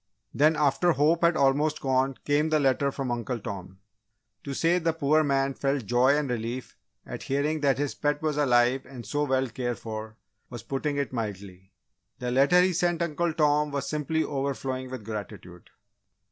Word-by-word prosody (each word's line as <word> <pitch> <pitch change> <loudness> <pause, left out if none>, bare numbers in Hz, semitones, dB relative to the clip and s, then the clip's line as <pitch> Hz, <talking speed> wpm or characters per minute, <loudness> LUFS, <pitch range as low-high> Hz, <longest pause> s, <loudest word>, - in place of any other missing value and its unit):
Then, 155 +3 +4
after 150 +4 +2
hope 155 +4 +2
had 170 0 +3
almost 145 +3 +2
gone, 135 0 +1
came 150 +2 +2
the 155 -1 +2
letter 140 0 +2
from 135 -2 -4
Uncle 120 +1 -2
Tom. 95 -3 -7 0.7
To 140 - -5
say 170 +4 +2
the 165 -1 0
poor 155 0 +2
man 135 -1 +1
felt 135 -3 -1
joy 125 +6 +3
and 150 -1 -1
relief 120 +1 -4 0.3
at - - -7
hearing 145 +3 -1
that 140 -3 +2
his 145 0 -1
pet 145 0 -1
was 155 -1 -1
alive 125 -2 +3
and 125 -3 -10
so 145 +7 -1
well 130 -1 +1
cared 120 0 -3
for, 110 0 -7 0.3
was 120 -2 -8
putting 140 +3 -2
it 140 -2 -2
mildly. 100 -5 -6 0.5
The 125 0 -3
letter 140 +8 +5
he 185 0 +2
sent 175 0 +1
Uncle 170 +1 -1
Tom 150 -1 +2
was 140 -1 -3
simply 155 +1 -1
overflowing 135 -2 -3
with 125 -5 -7
gratitude. 100 -5 -8
135 Hz, 175 wpm, -27 LUFS, 125-150 Hz, 0.7 s, letter